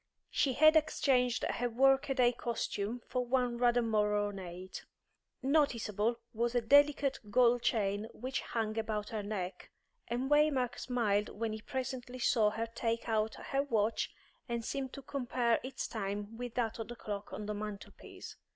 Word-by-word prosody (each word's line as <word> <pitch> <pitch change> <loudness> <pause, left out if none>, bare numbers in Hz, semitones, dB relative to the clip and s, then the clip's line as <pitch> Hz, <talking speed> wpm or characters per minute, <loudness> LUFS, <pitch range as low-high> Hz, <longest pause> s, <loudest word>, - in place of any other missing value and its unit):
She 270 - +2
had 310 +4 +6
exchanged 260 -5 +2
her 245 0 -1
work 270 +4 +3
a 270 - +1
day 245 -2 +5
costume 235 -1 -3
for 250 - -1
one 245 -1 0
rather 245 0 +3
more 210 -2 +2
ornate. 185 -3 -5 0.6
Noticeable 235 -6 +2 0.2
was 235 +2 -1
a 245 - +3
delicate 285 +2 +4
gold 245 +1 +4
chain 205 -2 0
which 260 +3 -4
hung 225 -1 -2
about 215 -1 -2
her 220 -2 -3
neck, 195 -3 -5 0.4
and 245 +3 -1
Waymark 295 -4 +2
smiled 215 -5 0
when 220 +1 -3
he 215 - -6
presently 255 0 -4
saw 230 -3 +3
her 225 +2 -2
take 230 0 -2
out 220 -1 0
her 275 - -1
watch 225 -5 0 0.4
and 235 -1 -2
seem 270 0 -3
to 275 - -10
compare 245 -4 0
its 260 +1 -4
time 205 0 -4
with 245 0 -6
that 230 -2 -1
of 225 - -4
the 240 - -7
clock 205 -3 -6
on 200 +2 -5
the 210 - -2
mantelpiece. 210 -1 -8
235 Hz, 160 wpm, -33 LUFS, 215-255 Hz, 0.6 s, had